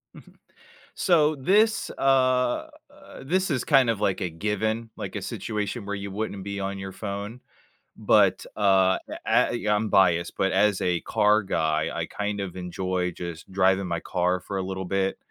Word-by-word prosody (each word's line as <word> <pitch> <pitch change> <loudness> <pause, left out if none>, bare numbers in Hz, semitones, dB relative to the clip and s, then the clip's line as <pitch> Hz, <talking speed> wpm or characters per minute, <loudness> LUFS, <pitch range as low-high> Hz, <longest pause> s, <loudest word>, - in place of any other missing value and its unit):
Mhm. - - -15 0.6
So, 155 -4 +3
this, 205 +11 +2
uh, 130 -2 +2 0.2
uh, - - -14
this 185 +6 0
is 135 -6 0
kind 135 -5 +4
of 105 -2 -1
like 95 -3 +1
a 90 - -1
given, 110 +6 -2
like - - -6
a - - -3
situation 105 +1 -4
where 100 0 -3
you 100 0 -6
wouldn't 100 -1 -4
be 100 0 -5
on 100 0 -3
your 95 0 -6
phone, 100 +4 -6 0.6
but, 100 -3 +3
uh, 95 -2 +3
e - - -5
I - - +3 0.2
I'm 105 +1 -1
biased, 85 -3 +3
but 95 - +1
as 100 0 +3
a 90 -2 0
car 105 0 +2
guy, 80 -3 0
I - - -2
kind 105 0 -4
of 95 -3 -5
enjoy 90 0 -2
just 85 0 -8
driving 95 0 +2
my 85 -1 -2
car 90 +2 0
for 95 +2 -6
a - - -1
little 95 0 -4
bit, 95 +1 -1
100 Hz, 175 wpm, -25 LUFS, 95-110 Hz, 0.6 s, kind